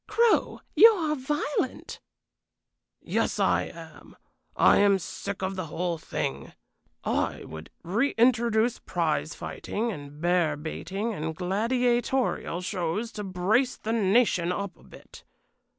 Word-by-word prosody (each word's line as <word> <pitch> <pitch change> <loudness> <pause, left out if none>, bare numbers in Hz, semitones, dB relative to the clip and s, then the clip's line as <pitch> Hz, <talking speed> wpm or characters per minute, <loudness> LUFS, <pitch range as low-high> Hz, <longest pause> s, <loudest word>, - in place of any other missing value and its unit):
"Crow, 465 -1 +2
you 455 - +10
are 325 -8 0
violent." 285 -1 -3 1.0
"Yes, - - -1
I - - +2
am. - - -12 0.4
I - - +5
am 200 -1 +5
sick 195 +2 -6
of 190 +1 -2
the 185 -3 -4
whole 170 +1 -2
thing. - - -4 0.5
I - - -1
would 80 0 -9
reintroduce 235 +2 +2
prize 165 -2 -1
fighting 230 +3 -3
and 145 -4 -9
bear 170 -3 +2
baiting 195 +8 -4
and 160 -3 -4
gladiatorial 240 +2 0
shows 185 +4 -2
to 210 - -6
brace 200 +7 +1
the 225 - -3
nation 200 -4 +3
up 200 +1 -4
a - - -22
bit. - - -15
200 Hz, 120 wpm, -27 LUFS, 175-240 Hz, 1.0 s, you